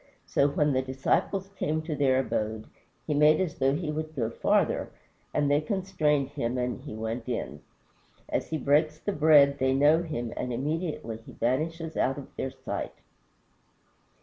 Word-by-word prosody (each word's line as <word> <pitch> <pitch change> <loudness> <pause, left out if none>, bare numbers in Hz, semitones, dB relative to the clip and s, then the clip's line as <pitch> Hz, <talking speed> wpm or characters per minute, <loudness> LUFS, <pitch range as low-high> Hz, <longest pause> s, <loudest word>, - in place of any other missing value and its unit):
So 140 - +2
when 145 0 +1
the 130 - +2
disciples 135 +9 -1
came 155 +1 -1
to 155 -1 -3
their 135 -3 +3
abode 110 -4 -2 0.4
"he 150 - -1
made 150 +1 +5
as 180 -5 -2
though 135 +1 +3
he 155 -1 -2
would 155 +1 -4
go 115 -4 -1
farther," - - +1 0.4
and 145 -1 +1
they 145 +1 +3
constrained 155 - 0
him 130 -4 -2
and 125 +1 -2
he 135 -6 -8
went 115 +2 -4
in. 120 - -4 0.7
As - - -2
he 160 - -2
breaks 150 +2 +2
the 205 - -2
bread 145 -4 +5
they 130 0 +2
know 150 +4 +5
him, 120 -9 -4
and 125 - -3
immediately 150 -3 -3
he 115 - -14
vanishes 160 +7 -1
out 135 +2 +1
of 140 - -10
their 135 - -2
sight. - - -5
145 Hz, 170 wpm, -28 LUFS, 130-155 Hz, 0.7 s, made